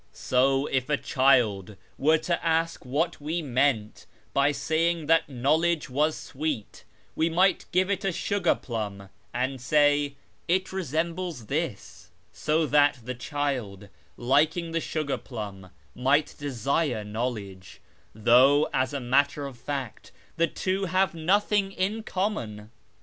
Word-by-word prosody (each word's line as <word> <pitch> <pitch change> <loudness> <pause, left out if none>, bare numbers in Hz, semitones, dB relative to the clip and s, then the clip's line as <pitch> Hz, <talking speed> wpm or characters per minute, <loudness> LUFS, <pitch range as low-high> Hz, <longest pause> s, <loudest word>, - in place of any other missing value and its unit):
So, 135 +2 +2
if 135 -1 -1
a 150 - +2
child 115 -9 +2 0.2
were 155 +3 +3
to 170 +2 -2
ask 165 0 0
what 155 +5 -1
we 160 +3 -2
meant 130 -5 0 0.3
by 140 +1 +3
saying 165 +2 0
that 165 -1 +3
knowledge 150 +4 +1
was 150 +4 +1
sweet, 145 -6 -5 0.3
we 160 +1 +1
might 185 +4 +2
give 185 +2 +2
it 200 +1 -1
a 195 - +1
sugar 185 0 +1
plum 100 -5 -5 0.2
and 130 +1 -2
say, 145 +1 +3 0.2
' - - -38
It 190 0 -10
re 190 - -1
sembles 165 -2 -3
this,' - - -4 0.2
so 155 +1 +1
that 145 -3 +3
the 125 +2 -4
child, 125 -7 -3 0.3
liking 155 +7 +2
the 165 0 -1
sugar 155 -4 -2
plum, 100 -6 -8 0.2
might 140 +4 +1
desire 140 -2 -1
knowledge; 105 -4 -5 0.4
though, 130 +7 +5
as 130 +2 0
a - - -1
matter 140 +3 +1
of 135 -2 -7
fact, 130 -1 -6 0.2
the 170 - +2
two 190 +3 -2
have 185 0 +1
nothing 195 +4 +1
in 200 +5 -1
common. 120 - -3
145 Hz, 140 wpm, -26 LUFS, 125-165 Hz, 0.4 s, though